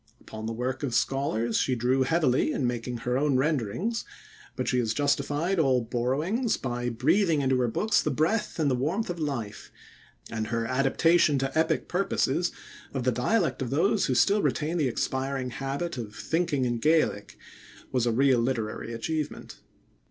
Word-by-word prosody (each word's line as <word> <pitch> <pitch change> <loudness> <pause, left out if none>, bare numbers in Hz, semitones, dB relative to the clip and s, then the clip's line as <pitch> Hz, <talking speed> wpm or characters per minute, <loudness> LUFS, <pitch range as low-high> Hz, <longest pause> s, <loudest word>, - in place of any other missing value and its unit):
Upon 110 0 -8
the - - -2
work 125 +3 -3
of 130 -6 -2
scholars 120 -5 0
she 130 - +1
drew 125 +3 +1
heavily 140 -1 +2
in 135 - -1
making 120 0 -2
her 125 +2 -1
own 145 -2 +2
renderings, 155 - -1 0.5
but - - -3
she 125 - +2
has 115 -2 0
justified 145 +5 0
all 130 -5 +3
borrowings 145 - 0
by 120 -1 -3
breathing 155 - +2
into 130 -1 +2
her 125 - +2
books 210 - +1
the - - -1
breath 190 +9 0
and 150 -4 +1
the - - +2
warmth 165 - -1
of 175 - -6
life, 135 -9 -4 0.6
and 110 -1 -3
her 115 0 -1
adaptation 140 +5 +3
to 135 0 -2
epic 160 0 +1
purposes 175 -3 0 0.4
of 130 - -1
the 130 - +2
dialect 165 - 0
of 130 - -2
those 190 +8 +2
who 130 - 0
still 200 - +4
retain 160 0 0
the 145 - +2
expiring 130 +1 -2
habit 135 +4 -3
of 105 -2 -7
thinking 145 +4 0
in 120 -1 -1
Gaelic 155 -7 +1 0.5
was 125 -2 +1
a - - +2
real 130 +1 +3
literary 115 -2 -2
achievement. 155 +6 -4
135 Hz, 170 wpm, -27 LUFS, 120-160 Hz, 0.6 s, still